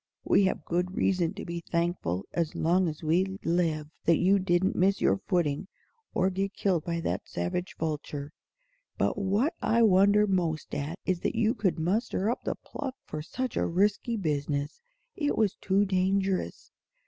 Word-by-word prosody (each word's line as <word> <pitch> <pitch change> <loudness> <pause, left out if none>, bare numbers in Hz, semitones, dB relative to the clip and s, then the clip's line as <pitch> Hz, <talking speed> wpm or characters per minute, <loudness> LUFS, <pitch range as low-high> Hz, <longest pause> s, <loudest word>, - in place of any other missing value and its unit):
We 200 - +4
have 190 - -1
good 180 +2 -1
reason 180 -1 +1
to 205 - -6
be 170 -1 -4
thankful 170 - -1
as 165 -2 -1
long 180 +3 +2
as 155 0 -5
we 185 +5 +1
live 165 -3 +1 0.2
that 165 -2 +5
you 195 +2 +4
didn't 185 0 +1
miss 190 +2 +3
your - - +3
footing 175 -2 0 0.5
or 190 +1 +2
get 195 +1 -2
killed 180 -6 +1
by 170 -1 -2
that 100 - -3
savage 90 - -3
vulture. 150 -2 -4 0.6
But - - +1
what 205 - +1
I 230 +1 +3
wonder 200 +1 +5
most 175 -6 -1
at 145 +4 -3
is 185 -2 0
that - - -2
you 225 0 +2
could 200 -4 0
muster 195 +4 0
up - - -4
the - - -1
pluck 270 -3 -6
for 155 - -5
such 255 +10 -4
a - - +1
risky 205 +6 +1
business. 145 - -2 0.3
It 295 -5 -1
was 215 -4 +2
too 195 +1 +1
dangerous." 190 0 0
185 Hz, 170 wpm, -28 LUFS, 165-200 Hz, 0.6 s, that